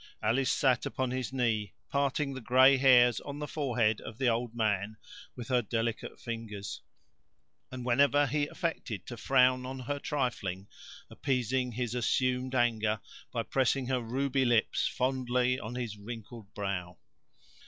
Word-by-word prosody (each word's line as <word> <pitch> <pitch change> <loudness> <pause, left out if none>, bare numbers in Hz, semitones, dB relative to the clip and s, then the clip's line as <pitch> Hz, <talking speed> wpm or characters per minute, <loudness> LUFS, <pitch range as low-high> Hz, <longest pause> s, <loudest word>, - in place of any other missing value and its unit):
Alice 125 +5 +2
sat 130 -4 +2
upon 130 -1 -2
his 130 -2 -3
knee, 115 -6 -1 0.2
parting 140 0 0
the 130 - -6
gray 130 +3 +6
hairs 125 -3 +6
on 140 0 -7
the 150 0 -4
forehead 120 -8 0
of 110 - -9
the 130 0 +1
old 120 0 0
man 110 -2 0 0.4
with 120 -2 -8
her 125 -1 +3
delicate 115 +1 -3
fingers; 115 -4 -6 0.9
and 125 -1 -6
whenever 140 +3 +4
he 145 +2 0
affected 140 - -4
to 120 - -7
frown 130 0 +3
on 130 +1 -6
her 145 +3 -3
trifling, 110 - -2 0.4
appeasing 125 -1 -1
his 120 0 -2
assumed 130 +1 0
anger 110 -3 +1 0.3
by 115 -2 -1
pressing 130 +1 +1
her 130 -1 +1
ruby 135 +3 0
lips 120 -3 +2
fondly 125 -1 0
on 115 +2 -6
his 120 -4 -4
wrinkled 110 0 -9
brow. 90 -4 -3
125 Hz, 145 wpm, -30 LUFS, 115-130 Hz, 0.9 s, gray